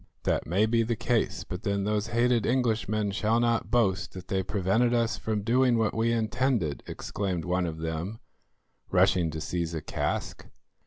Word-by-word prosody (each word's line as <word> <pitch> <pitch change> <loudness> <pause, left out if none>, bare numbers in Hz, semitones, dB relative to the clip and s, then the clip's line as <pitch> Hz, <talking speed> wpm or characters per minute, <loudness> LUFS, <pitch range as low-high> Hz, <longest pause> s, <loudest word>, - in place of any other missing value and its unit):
"That - - 0
may 95 +7 +3
be 115 +1 +2
the 115 +1 0
case, 120 +1 0
but 90 -1 -6
then 100 -2 -1
those 105 +1 0
hated 120 0 +2
Englishmen 110 -4 +1
shall 110 +3 +1
not 115 -1 +1
boast 105 -6 +1
that 90 0 -9
they 95 -1 +1
prevented 105 +6 +1
us 115 0 +1
from 110 -2 -2
doing 125 +2 +3
what 110 -2 +1
we 115 +1 +1
intended," 115 - 0
exclaimed 95 -5 -3
one 90 0 0
of 80 -1 -5
them, 80 +6 -4 0.7
rushing 85 -3 +3
to 80 0 -5
seize 85 0 -3
a 80 - -3
cask. - - -3
105 Hz, 170 wpm, -28 LUFS, 90-115 Hz, 0.7 s, may